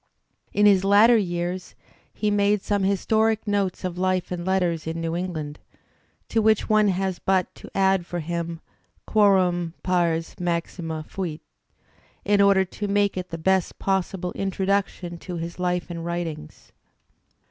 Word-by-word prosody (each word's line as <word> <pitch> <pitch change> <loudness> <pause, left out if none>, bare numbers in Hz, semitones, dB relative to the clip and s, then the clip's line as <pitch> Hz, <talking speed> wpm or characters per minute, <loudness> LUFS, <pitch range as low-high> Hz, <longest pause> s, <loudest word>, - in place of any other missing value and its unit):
In 205 - +3
his 195 -2 +5
later 205 +4 +6
years 180 -2 -2 0.4
he 210 -1 -1
made 205 0 +2
some 205 -1 0
"Historic 220 +3 +1
Notes 200 -3 -1
of 180 -1 -3
Life 185 -1 0
and 175 -1 -3
Letters 175 -4 0
in 165 +1 -3
New 165 0 -2
England," 160 -5 -4 0.7
to 225 - +1
which 220 0 +3
one 215 -1 +4
has 190 -1 -1
but 190 -2 +1
to - - -12
add 190 -2 +2
for 175 - -3
him 170 0 -4 0.4
''quorum 185 -5 +3
pars 170 -3 0
maxiffmfuit^'' 170 -1 -3 0.8
in 205 0 +3
order 200 -1 +5
to 205 +3 -5
make 200 0 +1
it 185 -1 -4
the 165 - -5
best 190 +2 +1
possible 190 -1 -1
introduction 190 -2 -2
to 180 - -7
his 170 +1 -6
life 180 -1 -1
and 170 -1 -5
writings. 170 - -5
185 Hz, 145 wpm, -24 LUFS, 170-200 Hz, 0.8 s, later